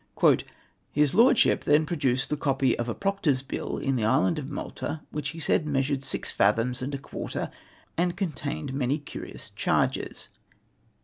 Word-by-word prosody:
" - - -33
His 150 -1 +3
Lordship 245 +2 +5
then 150 +2 +4
produced 135 -5 0
the - - +2
copy 135 -3 +1
of 120 0 -1
a 115 - -2
Proctor's 180 -10 0
Bill 135 - -4
in 135 -1 0
the 115 - -1
island 95 -4 +3
of - - -5
^Nlalta, 160 - -5
Avhich 150 -1 -2
he 165 - -8
said 155 0 +1
measured 135 0 +1
six 100 -7 -2
fathoms 115 +5 +2
and 140 +2 -2
a - - -2
quarter, 135 - -5 0.5
and 175 0 +1
contained 150 -5 -3
many 135 +1 +1
curious 145 - -6
charges. - - 0
140 Hz, 165 wpm, -27 LUFS, 130-155 Hz, 0.5 s, Lordship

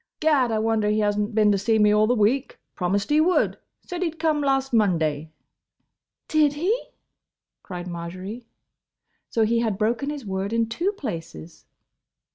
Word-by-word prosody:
Gad! 295 -6 +3
I 220 - +1
wonder 220 -1 +1
he 210 - +1
has 205 -1 +1
n't 210 +1 -2
been 210 -1 +4
to 200 - +1
see 220 +3 +2
me 210 -1 +4
all 210 0 +4
the 245 - +2
week. 240 +6 +1 0.2
Promised 200 +6 -1
he 300 +1 +5
would. 355 +3 +2 0.3
Said 355 0 -5
he 355 - +1
'd 325 - -13
come 310 -2 +1
last 270 -2 0
Monday." 160 -8 +1 1.0
"Did 305 -2 +3
he?" 350 +10 +1 0.9
cried 180 -2 -7
Marjory. 185 +7 -7 0.8
So 225 -1 +2
he 230 +2 +1
had 220 -4 -1
broken 235 +6 0
his 290 -5 -6
word 195 +2 -3
in 230 0 +1
two 335 - -1
places! 165 - -8
220 Hz, 170 wpm, -24 LUFS, 200-275 Hz, 1.0 s, he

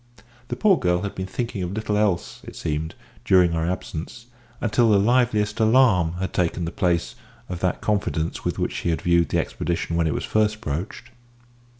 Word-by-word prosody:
The - - -3
poor 200 -4 +3
girl 90 +1 +1
had 100 - -3
been 95 0 -5
thinking 115 0 -4
of 90 +1 -3
little 110 0 -2
else, 105 -4 0
it - - -10
seemed, 80 +1 -3 0.3
during 90 -3 +4
our 80 +1 0
absence, 90 +4 -5 0.3
until 115 +1 +2
the 105 - +5
liveliest 110 -1 +2
alarm 110 -8 +4
had 95 +2 -4
taken 85 -1 0
the 85 - -4
place 85 -2 0 0.3
of 90 -2 -5
that 90 -1 -1
confidence 100 -6 -1
with - - -2
which - - -1
she - - -2
had 80 - -1
viewed 85 -2 +3
the - - 0
expedition 85 -1 -2
when 85 -1 +2
it 75 - -1
was - - -2
first 110 0 +1
broached. 95 +7 -5
95 Hz, 190 wpm, -23 LUFS, 85-110 Hz, 0.3 s, the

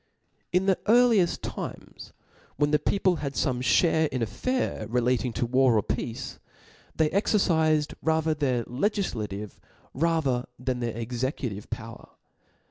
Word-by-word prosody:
In 180 +2 +2
the 195 -2 +2
earlieft 225 -5 +4
times, - - -7 0.4
when 145 +1 +1
the 150 - +4
people 185 +2 +1
had 140 -2 -4
fome 125 -3 0
iliare 160 +4 +3
in 130 -3 -3
the - - +2
affairs 115 - -2
relating 125 +1 +1
to 120 +1 -1
war 130 -1 +3
or 105 - +2
peace^ 115 +2 -4 0.6
they 155 -1 +2
exercifed 160 -7 +2
rather 160 0 +1
their 130 -5 0
legiQativc 115 - -3 1.0
than 125 0 -2
their 120 -2 -2
cxecu^ 125 +3 -3
tive 100 +1 -9
power. - - -7
140 Hz, 130 wpm, -27 LUFS, 120-170 Hz, 1.0 s, earlieft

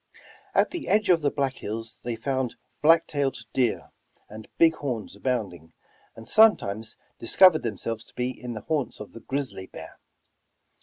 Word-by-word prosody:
At - - +3
the 350 -3 -5
edge 210 +1 +2
of 170 -2 +4
the 145 - +2
Black 135 -2 -1
Hills 115 +2 -6
they 120 -1 -3
found 130 +1 -2 0.3
black 165 +2 +6
tailed 140 -3 -1 0.2
deer 125 -4 0 0.4
and 110 +1 -10
big 165 -1 +6
horns 125 -7 -4
abounding, 95 -11 -3 0.4
and 115 0 -11
sometimes 110 - +3 0.2
discovered 170 +7 +5
themselves 115 0 -4
to - - -22
be 125 +1 -1
in 125 -2 -7
the 110 - -6
haunts 150 +2 -2
of 105 - -9
the 115 - -9
grizzly 135 -9 -4
bear. - - -11
125 Hz, 160 wpm, -26 LUFS, 110-145 Hz, 0.4 s, black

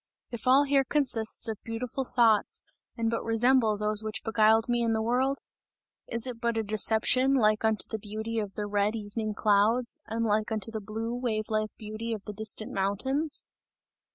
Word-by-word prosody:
If 235 0 -6
all 265 +3 +6
here 280 -1 +2
consists 240 -6 0
of 220 -2 -5
beautiful 245 +3 -4
thoughts 230 -4 +2 0.3
and 230 -1 0
but 230 - -2
resemble 225 -1 +3
those 210 +1 +1
which 215 0 -4
beguiled 220 0 +3
me 240 -1 +1
in 230 -1 +1
the 220 - 0
world? 260 +4 0 0.7
Is 230 0 +1
it 245 -3 -5
but 235 -1 0
a 225 - 0
deception 220 +5 +2
like 215 -4 +2
unto 220 -1 +2
the 220 - -4
beauty 220 +2 -4
of 205 -2 -5
the 210 - -3
red 205 +1 0
evening 215 0 -4
clouds 220 +4 +2
and 230 +1 -2
like 215 +1 0
unto 220 0 -3
the 220 -1 -5
blue 225 +3 -4
wave 230 -3 -2
like 215 -1 0
beauty 215 +2 -5
of 210 -3 -6
the 210 - -6
distant 215 +1 -1
mountains! 265 +11 0
225 Hz, 180 wpm, -28 LUFS, 215-240 Hz, 0.7 s, all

